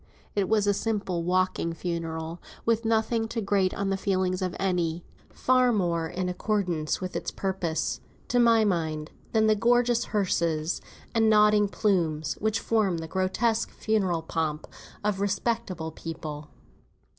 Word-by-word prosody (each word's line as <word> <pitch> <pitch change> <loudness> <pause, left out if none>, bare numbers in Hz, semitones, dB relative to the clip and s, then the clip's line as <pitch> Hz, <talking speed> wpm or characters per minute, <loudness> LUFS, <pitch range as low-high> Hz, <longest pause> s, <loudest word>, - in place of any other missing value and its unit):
It 200 -2 0
was 215 -2 +3
a 205 - +3
simple 200 -5 -1
walking 185 -1 +1
funeral, 165 -1 -4 0.2
with 230 0 +1
nothing 225 0 +1
to 230 +1 -3
grate 195 -3 +2
on 195 -1 -1
the 195 - +1
feelings 185 -1 0
of 185 -1 -2
any; 175 -3 0 0.3
far 255 -1 +3
more 170 -6 0
in 180 +3 -3
accordance 180 -4 -1
with 185 -1 -5
its - - -2
purpose, 185 -5 -2 0.3
to 245 - +2
my 230 -2 +5
mind, 160 -5 -1 0.2
than 220 -1 +3
the 215 - +5
gorgeous 240 +2 +3
hearses, 170 -5 0 0.3
and 225 -2 +4
nodding 210 -1 +5
plumes, 165 -8 0
which 220 0 0
form 205 -6 +1
the 160 0 -5
grotesque 195 +6 0
funeral 190 -7 0
pomp 160 -2 -2 0.4
of 205 -2 0
respectable 200 -5 -1
people. 155 -2 -7
190 Hz, 145 wpm, -27 LUFS, 170-220 Hz, 0.4 s, my